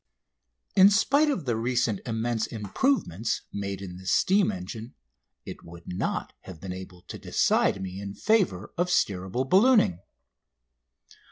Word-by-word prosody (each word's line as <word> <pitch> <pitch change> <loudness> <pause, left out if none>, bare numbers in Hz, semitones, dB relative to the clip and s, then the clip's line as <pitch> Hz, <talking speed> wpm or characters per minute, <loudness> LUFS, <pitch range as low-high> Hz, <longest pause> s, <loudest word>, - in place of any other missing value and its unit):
In 190 +1 +8
spite 280 +9 +3
of 270 - -2
the 120 -3 0
recent 120 -2 0
immense 115 0 -1
improvements 110 - -1
made 100 -1 -4
in 90 -2 -8
the 95 0 -11
steam 195 - +3
engine 110 +6 -8 0.5
it - - -9
would 85 0 -12
not 90 - -3
have 90 -4 -10
been 95 +2 -6
able 90 -1 -10
to - - -9
decide - - +1
me 95 0 -6
in 100 0 -7
favour 145 - +1
of 175 +1 +1
steerable 95 - 0
ballooning. 200 - +4
110 Hz, 140 wpm, -27 LUFS, -, 0.5 s, In